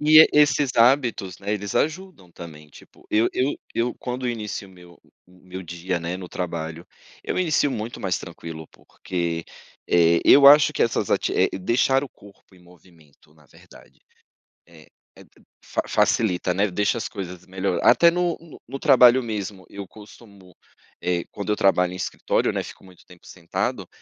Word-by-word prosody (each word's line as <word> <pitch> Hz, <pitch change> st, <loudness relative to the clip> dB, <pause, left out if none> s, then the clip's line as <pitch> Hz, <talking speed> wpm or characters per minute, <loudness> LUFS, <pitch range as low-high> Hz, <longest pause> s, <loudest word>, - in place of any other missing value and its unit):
E 155 Hz, +1 st, +6 dB
e -, -, +6 dB
esses 145 Hz, -2 st, +3 dB
hábitos, 115 Hz, -6 st, +2 dB
né, 100 Hz, +1 st, -4 dB
eles 100 Hz, -1 st, -4 dB
ajudam 160 Hz, -, -3 dB
também, 75 Hz, -3 st, -12 dB
tipo, -, -, -19 dB
eu 110 Hz, +2 st, +2 dB
eu 135 Hz, +3 st, 0 dB, 0.2 s
eu 120 Hz, +1 st, -1 dB
quando 125 Hz, 0 st, -4 dB
eu 120 Hz, -, 0 dB
inicio 105 Hz, -3 st, -6 dB
o -, -, -18 dB
meu 90 Hz, -1 st, -17 dB, 0.3 s
o 90 Hz, 0 st, -22 dB
meu 95 Hz, +1 st, -8 dB
dia, 85 Hz, +1 st, -4 dB
né, 85 Hz, +2 st, -4 dB
no 90 Hz, -2 st, -9 dB
trabalho, 85 Hz, -2 st, -5 dB, 0.4 s
eu -, -, -3 dB
inicio 155 Hz, -5 st, +1 dB
muito 115 Hz, 0 st, -5 dB
mais 95 Hz, -3 st, -1 dB
tranquilo 80 Hz, -2 st, -9 dB
porque, 85 Hz, -2 st, -5 dB, 0.4 s
eh, 85 Hz, -1 st, +4 dB
eu 140 Hz, 0 st, +7 dB
acho 145 Hz, -1 st, +6 dB
que -, -, 0 dB
essas -, -, -1 dB
ativi -, -, +1 dB
eh, -, -, -5 dB
deixar 130 Hz, +7 st, +1 dB
o -, -, -10 dB
corpo 100 Hz, -3 st, -20 dB
em -, -, -19 dB
movimento 85 Hz, -4 st, -23 dB
na 75 Hz, -2 st, -24 dB
verdade. -, -, -19 dB, 0.7 s
Eh, 80 Hz, -3 st, -18 dB, 0.3 s
etro -, -, -20 dB, 0.2 s
fa -, -, -2 dB
facilita, 90 Hz, -4 st, +1 dB
né, 100 Hz, +3 st, +1 dB
deixa 105 Hz, +5 st, 0 dB
as -, -, -5 dB
coisas 90 Hz, -2 st, -8 dB
melhor 95 Hz, 0 st, -2 dB
até 170 Hz, 0 st, +6 dB
no 175 Hz, -1 st, -1 dB, 0.3 s
no 135 Hz, +3 st, -7 dB
trabalho 130 Hz, -3 st, +5 dB
mesmo, 100 Hz, -4 st, -6 dB
eu 100 Hz, -1 st, -9 dB
costumo, 100 Hz, -3 st, -16 dB, 0.5 s
eh, 90 Hz, -1 st, -1 dB
quando 105 Hz, +1 st, -4 dB
eu 105 Hz, -, +2 dB
trabalho 90 Hz, -2 st, +2 dB
em -, -, -7 dB
escritório, 90 Hz, -, -1 dB
né, -, -, -1 dB
fico -, -, -12 dB
muito 90 Hz, -2 st, -18 dB
tempo 90 Hz, -1 st, -19 dB
sentado, 85 Hz, -2 st, -4 dB
95 Hz, 175 wpm, -23 LUFS, 90-120 Hz, 0.7 s, eu